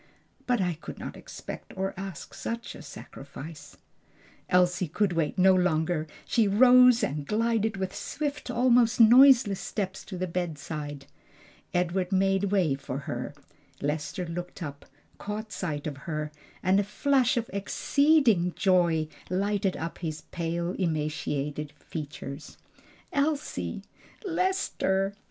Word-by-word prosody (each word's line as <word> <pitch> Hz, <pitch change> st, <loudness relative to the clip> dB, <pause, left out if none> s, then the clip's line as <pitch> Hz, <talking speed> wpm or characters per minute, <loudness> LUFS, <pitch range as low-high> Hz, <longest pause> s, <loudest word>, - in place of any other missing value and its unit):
But 245 Hz, -2 st, +2 dB
I 175 Hz, -4 st, -1 dB
could -, -, -8 dB
not -, -, -7 dB
expect -, -, -9 dB
or 190 Hz, 0 st, -1 dB
ask 190 Hz, -4 st, -7 dB
such 230 Hz, +1 st, -5 dB
a -, -, -10 dB
sacrifice." 145 Hz, +1 st, -10 dB, 0.7 s
Elsie 180 Hz, 0 st, +3 dB
could 195 Hz, +4 st, 0 dB
wait 165 Hz, +2 st, -1 dB
no 190 Hz, +1 st, +6 dB
longer; 160 Hz, -3 st, +1 dB, 0.2 s
she 225 Hz, -3 st, +2 dB
rose 250 Hz, +3 st, +7 dB
and 145 Hz, +1 st, -1 dB
glided 220 Hz, +2 st, 0 dB
with 190 Hz, 0 st, -3 dB
swift, 285 Hz, +8 st, -4 dB
almost 245 Hz, -1 st, +3 dB
noiseless 240 Hz, -3 st, +7 dB
steps 190 Hz, -2 st, -4 dB
to 190 Hz, -, -7 dB
the 185 Hz, -, -1 dB
bedside. 155 Hz, -5 st, -4 dB, 0.7 s
Edward 180 Hz, +1 st, 0 dB
made 195 Hz, +1 st, +2 dB
way 190 Hz, -7 st, +2 dB
for 135 Hz, -1 st, -5 dB
her. 125 Hz, +1 st, -5 dB, 0.4 s
Lester 150 Hz, +5 st, -2 dB
looked 175 Hz, +2 st, -6 dB
up, 145 Hz, -2 st, -8 dB, 0.3 s
caught 215 Hz, +1 st, -5 dB
sight 160 Hz, -6 st, -3 dB
of 145 Hz, -3 st, -4 dB
her, 150 Hz, +1 st, -4 dB, 0.3 s
and 190 Hz, +2 st, +4 dB
a -, -, +2 dB
flash 250 Hz, +5 st, +2 dB
of 235 Hz, -1 st, -1 dB
exceeding 225 Hz, -, +3 dB
joy 170 Hz, -4 st, +3 dB, 0.2 s
lighted 195 Hz, +1 st, 0 dB
up 165 Hz, +1 st, -5 dB
his 155 Hz, -3 st, -4 dB
pale, 170 Hz, 0 st, -2 dB
emaciated 150 Hz, -3 st, -2 dB
features. 145 Hz, -1 st, -8 dB, 0.6 s
"Elsie!" 290 Hz, 0 st, -1 dB, 0.4 s
"Lester!" 330 Hz, -, 0 dB
185 Hz, 125 wpm, -28 LUFS, 160-220 Hz, 0.7 s, rose